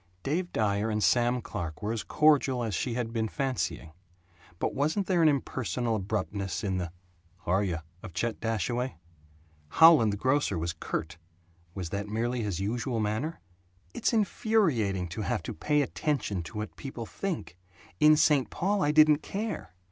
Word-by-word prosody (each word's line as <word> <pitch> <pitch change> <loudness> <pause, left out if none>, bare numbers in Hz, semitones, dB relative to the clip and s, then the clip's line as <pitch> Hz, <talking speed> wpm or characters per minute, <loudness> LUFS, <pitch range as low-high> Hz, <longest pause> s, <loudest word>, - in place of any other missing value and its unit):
Dave 175 +6 -1
Dyer 105 0 0
and 105 -1 0
Sam 120 0 +3
Clark 80 +2 -5
were 105 +2 -1
as 115 - -2
cordial 140 -4 +3
as 110 -3 -2
she 115 +6 -1
had 115 -2 -3
been 110 -1 0
fancying; 130 - -2 0.7
but - - -1
wasn't 155 +8 0
there 180 -3 +2
an 160 - +6
impersonal 125 -4 -1
abruptness 95 -2 -3
in 95 -2 -1
the 90 - -1
"H' - - -8 0.6
are 95 +4 +2
yuh?" 90 -5 -1 0.2
of 90 - -10
Chet 120 +3 -1
Dashaway? 120 +2 -1 0.7
Howland 155 - +7
the 100 - -3
grocer 130 -4 +1
was 85 +1 -2
curt. 80 0 -4 0.6
Was 90 -4 -4
that 100 +1 -3
merely 120 +3 -1
his 100 -5 -2
usual 115 +4 -1
manner? 110 +10 -2 0.5
"It's - - 0
infuriating 170 - +1
to 100 +6 -5
have 100 - -1
to - - -5
pay 150 - +1
attention 140 - -1
to 80 - -8
what 105 0 -5
people 135 -5 -6
think. 160 - -5 0.4
In 155 0 +7
St. 145 -4 +3
Paul 200 +2 0
I 145 - +3
didn't 155 -1 +6
care. 205 - -5
115 Hz, 165 wpm, -29 LUFS, 100-150 Hz, 0.7 s, Howland